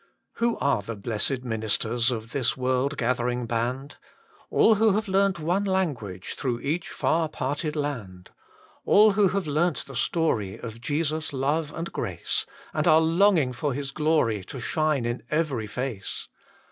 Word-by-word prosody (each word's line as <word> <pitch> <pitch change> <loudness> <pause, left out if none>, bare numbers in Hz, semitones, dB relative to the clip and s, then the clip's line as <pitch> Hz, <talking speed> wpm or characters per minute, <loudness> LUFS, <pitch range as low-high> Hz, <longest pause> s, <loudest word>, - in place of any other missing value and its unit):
Who 235 0 +1
are 140 -7 +1
the 115 +3 -6
blessed 115 +5 -1
ministers 115 0 0
Of 115 -2 -4
this 130 -2 0
world 130 +3 0
gathering 125 -1 0
band? 125 +5 -2 0.5
All 225 - +5
who 220 0 +4
have 215 +1 0
learnt 195 0 +2
one 175 +6 0
language, 145 - -2
Through 120 -3 -2
each 165 +5 -2
far 160 0 0
parted 150 +2 -3
land; 115 -12 -4 0.5
All 215 +1 +6
who 200 0 +4
have 195 +1 -1
learnt 155 +2 0
the 135 - -10
story 115 - 0
Of 115 -1 -8
Jesu 150 +4 0
s 160 - -5
love 145 +3 0
and 165 +2 -5
grace, - - -2 0.3
And - - 0
are 155 - +7
longing 165 -4 +3
for 140 +1 -2
His 140 -1 -4
glory 150 -10 +1
To 130 - -7
shine 150 0 0
in 120 +1 -2
every 150 -8 0
face. 120 -3 -4
140 Hz, 160 wpm, -26 LUFS, 120-165 Hz, 0.5 s, are